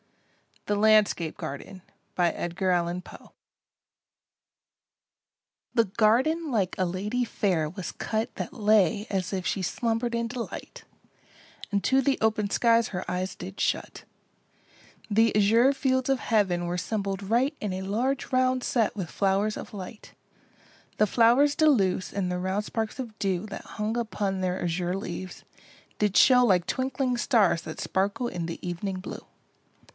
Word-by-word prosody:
THE 205 - 0
LANDSCAPE 210 -6 +3
GARDEN 160 +7 -7 0.3
The 175 0 -1 2.7
garden 265 +9 +3
like 200 -6 0
a 185 - +2
lady 205 +8 -2
fair 180 -9 0
was 185 +2 -6
cut 220 +1 -3
That - - -5
lay 210 -3 +3
as 190 -1 -2
if 185 -1 -2
she 195 - -1
slumbered 230 +5 -1
in 235 0 -1
delight, 240 0 -7 0.9
And 200 -1 0
to 265 +1 +3
the 270 +1 +1
open 215 -2 +1
skies 230 +1 +3
her 185 -1 -4
eyes 185 +1 -2
did 185 +2 -9
shut; - - -2 1.1
The 225 +1 +3
azure 225 +6 +5
fields 260 -1 0
of 270 -1 +2
heaven 190 -6 +1
were 175 +1 -2
'sembled 195 0 -2
right 260 +6 +2
In 205 -3 -3
a 185 - -4
large 245 +8 -1
round 255 0 +2
set 225 -4 +1
with 185 -6 -4
flow'rs 200 +2 0
of - - -8
light: 205 +2 -9 0.8
The 215 - +4
flowers 245 +7 +4
de 310 - +4
luce 190 -9 +1
and 190 -2 -1
the 180 - -2
round 190 +3 -1
sparks 220 0 -3
of 235 -5 -7
dew 190 -1 -1
That 200 - -8
hung 215 +2 -1
upon 205 -4 -2
their 185 0 -1
azure 175 +1 -1
leaves, 185 -1 -6 0.6
did 210 -2 +1
show 250 -1 +7
Like 180 -6 +3
twinkling 260 -1 -1
stars 215 -9 +2
that 155 - -7
sparkle 200 +6 -1
in 175 -6 -4
the 165 - -6
ev'ning 185 +2 -3
blue. 185 - -8
205 Hz, 145 wpm, -27 LUFS, 185-235 Hz, 2.7 s, show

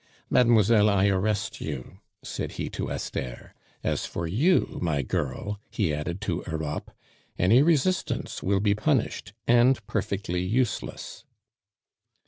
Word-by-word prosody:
"Mademoiselle, 110 -3 +5
I 100 0 +3
arrest 105 +2 -1
you!" 70 -5 -6 0.2
said - - -4
he - - -4
to - - -4
Esther. 60 -2 -5 0.3
"As - - -1
for 85 - -4
you, 140 - +2
my 75 -5 0
girl," 75 +11 -3
he 95 -8 0
added 80 +5 -3
to 90 -2 -2
Europe, 80 -2 -3 0.5
"any 110 +9 +5
resistance 170 +3 +1
will 95 +1 +1
be 100 -1 +3
punished, 110 -2 0
and 120 -1 +4
perfectly 95 -5 -2
useless." 115 +6 -2
100 Hz, 120 wpm, -26 LUFS, 85-115 Hz, 0.5 s, Mademoiselle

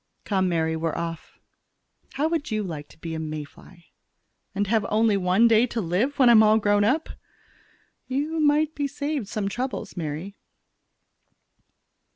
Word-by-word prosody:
"Come, 190 -3 0
Mary, 160 -2 0
we're 160 0 -2
off. 165 -1 -6 0.8
How 290 +3 0
would 320 -2 -2
you 215 -2 -1
like 155 -6 -6
to - - -19
be 165 0 -6
a 160 - -3
May 155 -1 -4
fly?" 170 +4 -17 0.7
"And 200 +1 0
have 220 +1 +1
only 215 0 +3
one 190 +4 +3
day 230 +1 +4
to 235 - -4
live 210 +10 -1
when 260 - +5
I'm 235 -2 +8
all 215 0 +5
grown 205 -1 +2
up?" 290 +10 +1 1.0
"You 295 +5 -2
might 305 +1 +2
be 285 -2 -2
saved 285 -4 -3
some 210 -2 -3
troubles, 240 -1 -4
Mary." 165 +3 -5
210 Hz, 160 wpm, -25 LUFS, 170-260 Hz, 1.0 s, I'm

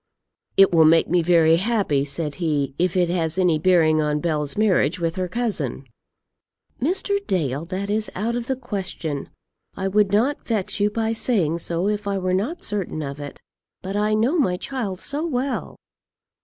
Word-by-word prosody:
"It 195 0 +7
will 160 -1 +6
make 165 +1 +5
me 175 0 +3
very 165 -1 +4
happy," 195 -8 +1
said 145 +1 -3
he, 145 -4 0
"if 180 +1 +1
it 180 -1 +3
has 165 -1 -1
any 175 -4 +3
bearing 160 -2 +4
on 150 0 0
Bell's 150 -2 -2
marriage 185 -6 +2
with 165 0 -1
her 185 -1 -2
cousin." 175 - -2 1.0
"Mr. 385 +7 +1
Dale, 150 -4 -1
that 190 +3 -4
is 215 +1 -1
out 225 +5 -1
of 240 0 -3
the 265 - 0
question. 185 - -5 0.5
I 190 - -2
would 200 0 +2
not 240 +8 +1
vex 215 -3 -1
you 205 +1 +3
by 225 +1 -1
saying 185 -9 0
so 170 +3 -2
if 210 -1 -2
I 200 -1 0
were 185 -1 -1
not 230 - -2
certain 195 -6 -3
of 140 0 -6
it; 145 -1 -8 0.4
but 190 +2 -4
I 210 +1 +1
know 250 +11 +2
my 180 -10 +1
child 210 -6 -4
so 290 +2 -2
well!" 275 -4 -2
185 Hz, 180 wpm, -23 LUFS, 160-215 Hz, 1.0 s, It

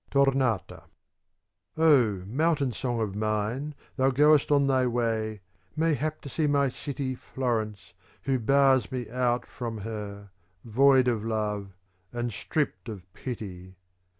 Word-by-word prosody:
Tomata 135 -7 +1 0.9
Oh 125 - +4
mountain 140 - +1
song 120 +1 -2
of 100 -3 -2
mine, 110 +7 -2 0.2
thou 130 0 +4
goest 150 +2 +4
on 140 -1 +4
thy 130 -2 +2
way, 110 -3 -1 0.3
mayhap 155 -1 0
to - - -9
see 155 +2 0
my 140 -1 +3
city 135 0 -4
Florence 115 -5 -3 0.3
who 135 -2 +1
bars 135 -1 +3
me 125 -3 -3
out 125 -1 0
from 115 -2 -5
her, 100 -2 -6 0.3
void 130 +3 +5
of 115 -4 +1
love 105 -4 -3 0.3
and 120 -1 -3
stripped 140 +3 -2
of 100 -5 -7
pity. 95 -7 -7
125 Hz, 125 wpm, -27 LUFS, 110-140 Hz, 0.9 s, void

